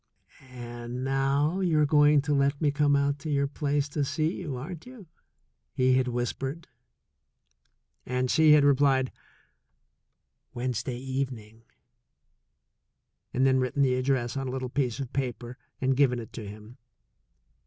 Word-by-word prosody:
"And 120 0 -7
now 135 +5 +1
you're 160 -5 +2
going 145 -1 +4
to 150 - 0
let 140 0 +1
me 150 -3 +2
come 145 0 +2
out 140 0 +1
to 155 - -6
your 140 -1 +1
place 145 0 -1
to 145 0 -1
see 155 +4 -1
you, 155 -9 -5
aren't 160 - -8
you?" 250 -6 -12 0.7
he 130 0 +3
had 130 0 +2
whispered. 130 +6 -3 1.4
And 125 0 -1
she 155 -1 +6
had 150 -1 +6
replied, 135 -2 +3 1.4
"Wednesday 125 0 -3
evening," 125 -4 -5 1.7
and 130 +2 +1
then 130 -1 +4
written 130 +2 +1
the 130 -2 +3
address 130 -1 0
on 135 -1 -3
a - - -3
little 130 -1 -4
piece 125 -2 -1
of 135 -3 -6
paper 125 -2 -4 0.2
and 130 0 +1
given 130 -2 +3
it 115 -2 -8
to 110 -3 -7
him. 105 +4 -11
135 Hz, 145 wpm, -27 LUFS, 125-145 Hz, 1.7 s, she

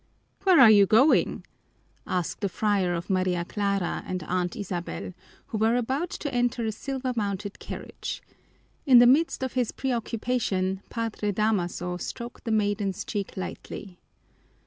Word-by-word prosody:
"Where 370 -5 +6
are 235 -5 +9
you 200 -2 +6
going?" 245 +9 +4 0.6
asked 180 +1 -2
the 200 - 0
friar 195 -3 +1
of 170 +1 -5
Maria 185 -2 +1
Clara 200 -2 -1
and 185 -2 -3
Aunt 175 +1 -1
Isabel, 185 -2 -5 0.4
who 220 - -3
were 225 +2 +3
about 265 +8 -1
to 290 -5 -5
enter 245 -1 +1
a 220 - 0
silver 260 +3 -3
mounted 205 -2 -3
carriage. - - -6 0.6
In 255 -3 +8
the 240 - +9
midst 275 +3 +3
of 260 - -3
his 250 -3 0
preoccupation 230 -6 -1
Padre 225 -3 -2
Damaso 180 -4 -1
stroked 235 +8 -7
the 230 - -1
maiden's 205 -3 0
cheek 200 -3 -4
lightly. 185 0 -7
210 Hz, 145 wpm, -26 LUFS, 185-245 Hz, 0.6 s, are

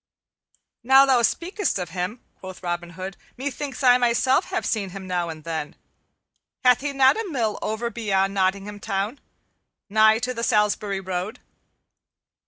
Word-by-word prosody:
"Now 265 +3 +7
thou 260 -3 +4
speakest 365 - 0
of 180 -3 -5
him," 185 +6 -4 0.2
quoth 185 -1 -10
Robin 175 -1 -3
Hood, 190 +1 -6 0.2
"methinks 280 +1 -5
I 250 -1 +6
myself 250 +6 +2
have 370 -1 -3
seen 205 -4 -1
him 190 +1 -8
now 175 -2 -2
and 155 -1 -8
then. 160 -2 -4 0.9
Hath 250 0 +5
he 290 0 -2
not 270 +2 +4
a 420 - -6
mill 235 -8 -1
over 230 +2 -2
beyond 195 -4 0
Nottingham 200 +2 -1
Town, 205 +4 -3 0.7
nigh 220 +1 +5
to 250 +2 -2
the 230 - -5
Salisbury 210 -3 +1
road?" 185 +2 -4
215 Hz, 150 wpm, -24 LUFS, 190-255 Hz, 0.9 s, Now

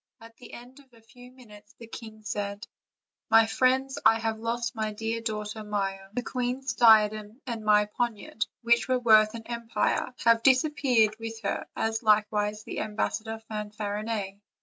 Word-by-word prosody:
At 230 0 -15
the 250 - -13
end 245 +3 -12
of 270 -2 -21
a 225 - -20
few 245 +2 -15
min 255 -4 -17
utes 210 +1 -16
the 230 - -11
king 220 -1 -10
said: 205 0 -4 0.6
"My 225 0 +6
friends, 260 +3 +1
I 225 - +6
have 225 -1 -3
lost 235 +1 -2
my 215 -2 -3
dear 225 +2 -3
daughter 215 -1 -4
Maia; 195 -2 -3
the 245 - -2
queen's 255 +2 -3
diadem 215 -1 +4
and 230 -4 -5
my 210 0 +4
poniard, 220 0 -3 0.2
which 235 +2 +2
are 255 - +3
worth 220 -3 +5
an 225 - -7
empire, 235 +1 -1
have 230 -1 +5
disappeared 255 -5 +3
with 225 0 -7
her, 200 - -3
as 225 0 -1
likewise 210 -1 +1
the - - -6
ambassador 220 +1 -3
Fanfarinet. 210 -1 -4
225 Hz, 165 wpm, -27 LUFS, 210-235 Hz, 0.6 s, My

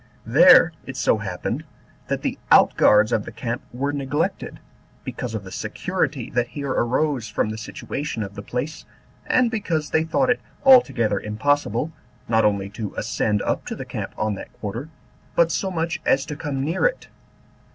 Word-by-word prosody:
There - - +7
it - - -6
so 110 - +2
happened, 95 -4 -3 0.4
that - - -2
the - - -2
out - - +6
guards 105 +2 +5
of 105 - +1
the - - -8
camp 120 0 -4
were 140 +4 -2
neglected, 145 +2 -2 0.4
because 120 -3 -5
of 105 - -4
the 95 - -10
security - - -2
that 120 0 +1
here 140 +1 -4
arose 130 0 0
from 105 - -1
the 110 - -5
situation 115 +2 -4
of 100 0 -7
the 100 - -7
place, 125 +9 -4 0.4
and 250 -2 +3
because 170 -9 -2
they 160 - +3
thought 245 +11 +2
it 245 - 0 0.2
altogether 120 - +5
impossible, 120 +5 0 0.4
not 110 -1 +3
only 100 -2 +1
to 105 -1 -6
ascend 105 -1 0
up - - -1
to - - -4
the - - -7
camp - - -5
on 105 0 0
that 100 - -8
quarter, 115 +8 -6 0.5
but 170 -1 +4
so 190 - -1
much 170 -1 -2
as 135 0 +2
to 150 -1 -5
come 145 -3 -3
near 165 +4 0
it. - - -5
130 Hz, 175 wpm, -23 LUFS, 110-155 Hz, 0.5 s, There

